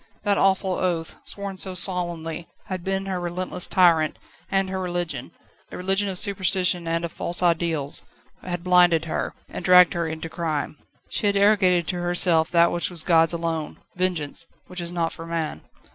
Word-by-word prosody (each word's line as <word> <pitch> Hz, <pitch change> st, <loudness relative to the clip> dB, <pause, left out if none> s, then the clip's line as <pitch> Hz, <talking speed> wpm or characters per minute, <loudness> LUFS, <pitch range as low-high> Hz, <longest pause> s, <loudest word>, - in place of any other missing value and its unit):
That 200 Hz, -1 st, +1 dB
awful 190 Hz, 0 st, +2 dB
oath, 175 Hz, -3 st, -2 dB
sworn 200 Hz, -2 st, -5 dB
so 190 Hz, -1 st, -1 dB
solemnly, 170 Hz, -3 st, -2 dB, 0.2 s
had 185 Hz, -2 st, -5 dB
been 195 Hz, +1 st, -2 dB
her 190 Hz, -2 st, -3 dB
relentless 180 Hz, +1 st, -3 dB
tyrant; 170 Hz, -5 st, +3 dB, 0.3 s
and 195 Hz, 0 st, +1 dB
her 190 Hz, 0 st, -4 dB
religion 175 Hz, -8 st, -3 dB, 0.4 s
a -, -, -7 dB
religion 195 Hz, +2 st, +1 dB
of 185 Hz, -, -3 dB
superstition 185 Hz, -3 st, +1 dB
and 165 Hz, +1 st, -1 dB
of 170 Hz, -, -6 dB
false 175 Hz, +1 st, +1 dB
ideals 165 Hz, -4 st, +1 dB, 0.4 s
had 175 Hz, -1 st, -5 dB
blinded 175 Hz, -3 st, +4 dB
her, 160 Hz, -, -3 dB
and -, -, -7 dB
dragged 180 Hz, -1 st, +6 dB
her 170 Hz, -1 st, -2 dB
into 160 Hz, +1 st, -5 dB
crime. 155 Hz, -3 st, -3 dB, 0.3 s
She 210 Hz, -, 0 dB
had 200 Hz, 0 st, +2 dB
arrogated 190 Hz, -4 st, +3 dB
to 180 Hz, -2 st, -2 dB
herself 175 Hz, -2 st, +3 dB
that 170 Hz, 0 st, +4 dB
which 175 Hz, -, -1 dB
was 170 Hz, -3 st, 0 dB
God's 165 Hz, -2 st, +4 dB
alone 165 Hz, -2 st, -3 dB, 0.2 s
"Vengeance!" 170 Hz, -3 st, -2 dB, 0.2 s
which 180 Hz, -1 st, -6 dB
is 170 Hz, 0 st, -2 dB
not 170 Hz, -2 st, -1 dB
for 165 Hz, -, -8 dB
man. 165 Hz, -, -3 dB
175 Hz, 175 wpm, -24 LUFS, 165-185 Hz, 0.4 s, dragged